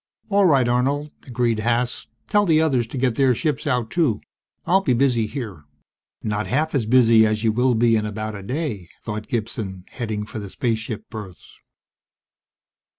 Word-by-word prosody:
"All 200 -2 +4
right, 135 -6 +4
Arnold," 140 +5 0 0.2
agreed 120 -3 0
Haas. 120 +2 -1 0.2
"Tell 205 -1 +3
the 160 -2 +4
others 135 -7 +2
to 130 - -7
get 125 -1 +1
their 130 0 +3
ships 150 +2 -2
out 125 -4 0
too. 150 -12 +1 0.5
I'll 190 +2 +4
be 130 -10 +1
busy 120 -3 +2
here." 105 - -6 0.6
Not 105 0 -2
half 155 +5 0
as 125 -7 0
busy 115 -2 +6
as 110 0 +1
you 110 - +3
will 125 +2 +2
be 115 0 +4
in 105 -1 0
about 110 +1 -4
a 100 - -7
day, 115 - -3 0.2
thought 105 -1 -5
Gibson, 105 -5 -4
heading 110 -5 -4
for 110 - -7
the 100 -2 -7
spaceship 110 -1 -3
berths. 105 -6 -10
120 Hz, 170 wpm, -22 LUFS, 110-135 Hz, 0.6 s, busy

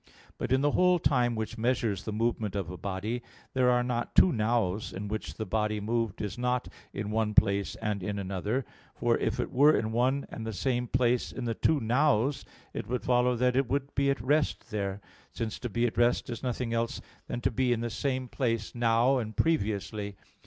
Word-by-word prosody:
But - - -3
in 130 +1 +4
the 145 +1 +3
whole 180 +2 +4
time 125 -6 +2
which 110 +1 -4
measures 115 -4 0
the 110 - -3
movement 110 -2 -1
of 95 -4 -3
a - - -6
body, 100 +6 -3 0.3
there 130 -1 +3
are 125 0 +3
not 120 -1 -2
two 185 - +7
"nows" 110 -3 0
in 100 +2 -5
which 110 +1 -4
the 110 - -4
body 105 +1 0
moved 110 -1 -1
is 105 +3 -4
not 125 0 0 0.2
in 105 +1 -4
one 110 -1 0
place 100 -1 +3
and 105 -3 -2
in 100 +2 -3
another; 100 +6 -2 0.3
for - - +2
if - - -1
it - - -2
were 145 +4 +5
in 110 +1 -1
one 130 +4 +1
and 115 - -6
the 110 0 -4
same 125 +3 0
place 125 0 +1
in 130 - -5 0.2
two 160 -2 +3
"nows," 135 +2 +2 0.3
it - - -5
would 125 +1 -2
follow 125 0 +3
that 125 +1 +2
it 135 -2 +2
would 140 0 -1
be 140 0 +2
at 140 - +1
rest 145 0 0
there; 100 -1 -2 0.3
since 115 -2 -4
to 120 - -4
be 120 +3 +1
at 120 - -1
rest 120 0 +2
is 115 - -5
nothing 125 -2 -2
else 115 0 -1 0.3
than - - -3
to - - +1
be 125 +1 +1
in 115 -1 +1
the 120 0 -2
same 130 +1 -1
place 115 -4 -1
now 120 +3 +3
and 110 -2 -5
previously. 105 -8 0
120 Hz, 210 wpm, -29 LUFS, 105-125 Hz, 0.3 s, two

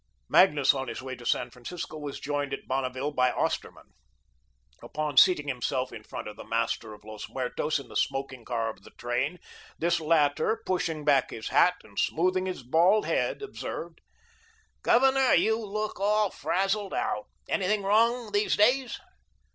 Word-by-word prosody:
Magnus 150 -7 +5
on 135 -1 -4
his - - -6
way 130 0 -5
to 120 -1 -9
San 120 0 0
Francisco 155 +8 -7
was 145 -2 -6
joined 145 -1 -2
at - - -14
Bonneville 130 +2 -2
by 125 -3 +2
Osterman. - - -3 0.9
Upon 150 -2 -4
seating 150 -3 +6
himself 130 -1 -2
in 115 - -8
front - - -7
of 105 - -8
the - - -8
master 115 -1 -2
of 105 - -20
Los 110 0 -8
Muertos 130 +4 -1
in 140 - -8
the - - -13
smoking 135 -2 -2
car 115 -1 -2
of 95 - -17
the - - -15
train, 130 +8 -1 0.4
this 170 +1 +1
latter, 155 +5 +2
pushing 165 -5 -1
back 140 -3 +3
his 110 - -6
hat 180 0 +4
and 100 -2 -7
smoothing 185 +3 +1
his 180 -8 -5
bald 175 - +3
head, - - -1
observed: 415 - -6 0.8
"Governor, 265 +1 +4
you 220 +1 +2
look 215 0 -4
all 210 0 +2
frazeled 195 +1 -1
out. 105 - -2 0.2
Anything 200 +2 0
wrong 225 +3 +2
these 205 +1 +1
days?" 250 +4 +3
150 Hz, 165 wpm, -28 LUFS, 130-200 Hz, 0.9 s, seating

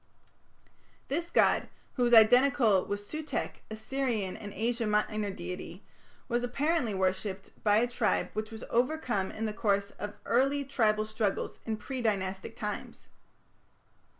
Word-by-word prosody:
This 335 +5 -1
god, - - +3 0.2
who 245 -2 +2
is 240 - +1
identical 230 -2 +6
with 205 0 -3
Sutekh, 310 0 -3
a 220 - -5
Syrian 220 -4 -2
and 205 -1 -8
Asia 230 +3 -1
Minor 210 0 0
deity, 180 -1 -7 0.4
was 240 -1 0
apparently 250 -2 0
worshipped 190 +1 -1
by 210 -1 +5
a 230 - +4
tribe 240 -2 0
which 215 +1 -3
was 225 0 -8
overcome 240 -6 0
in 225 - -4
the 215 - -2
course 200 -2 0
of 205 0 -5
early 275 +4 +2
tribal 215 -6 +2
struggles 215 -2 -2
in 220 -1 -1
pre 255 +4 -5
dynastic 195 -1 -2
times. 210 -2 -6
220 Hz, 140 wpm, -30 LUFS, 205-245 Hz, 0.4 s, identical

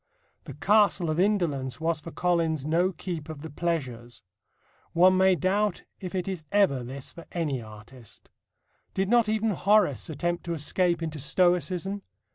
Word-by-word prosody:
The - - -8
Castle 200 -5 +3
of 155 - -1
Indolence 155 - 0
was 160 0 0
for 155 - -9
Collins 165 -4 0
no 170 +4 +2
keep 165 -3 -6
of 155 -2 -8
the 160 - -7
pleasures. 130 -9 -4 0.7
One 185 +2 +5
may 190 0 +4
doubt 195 +2 0 0.2
if 185 -1 -6
it 180 -1 -2
is 185 -5 -4
ever 190 -11 +3
this 130 +2 -8
for 170 - -12
any 150 -7 -2
artist. 110 +2 -13 0.7
Did 190 0 0
not 235 -2 +4
even 220 0 +1
Horace 195 - +2
attempt 175 +3 -2
to 170 -1 -2
escape 170 +2 0
into 155 -2 -4
Stoicism? 180 +4 +1
170 Hz, 155 wpm, -27 LUFS, 150-190 Hz, 0.7 s, One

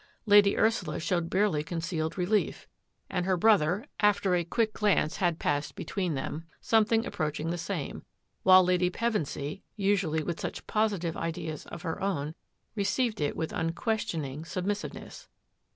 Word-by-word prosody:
Lady 205 -1 +6
Ursula 225 +1 +1
sh< 175 - -1
barely 185 -4 +1
concealed 165 0 -3
relief, 195 +4 0 0.4
and 180 -1 -2
her 185 -1 +2
brother, 200 - +3
aft 205 -1 +3 0.2
quick 225 -3 +1
glance 205 -7 +2
had 175 -3 +1
flashed 145 0 -1
between 180 -6 -2
them, 145 +4 -4 0.2
somet 225 0 +3
approaching 155 +1 -2
the 175 - -2
same, - - -4 0.4
while 185 0 +8
Lady 180 0 +2
Pevensy, 185 -6 -2 0.2
ally 190 -6 +1
with 170 +1 -3
such - - -5
positive 200 -7 0
ideas 160 -2 -4
of 155 - -8
her 165 -2 -3
own, 160 -6 -1 0.4
rea 220 +4 +1
it 145 - -1
with 160 - -3
unquestioning 165 - -2
submissiveness. 195 +4 -4
180 Hz, 135 wpm, -29 LUFS, 160-205 Hz, 0.4 s, while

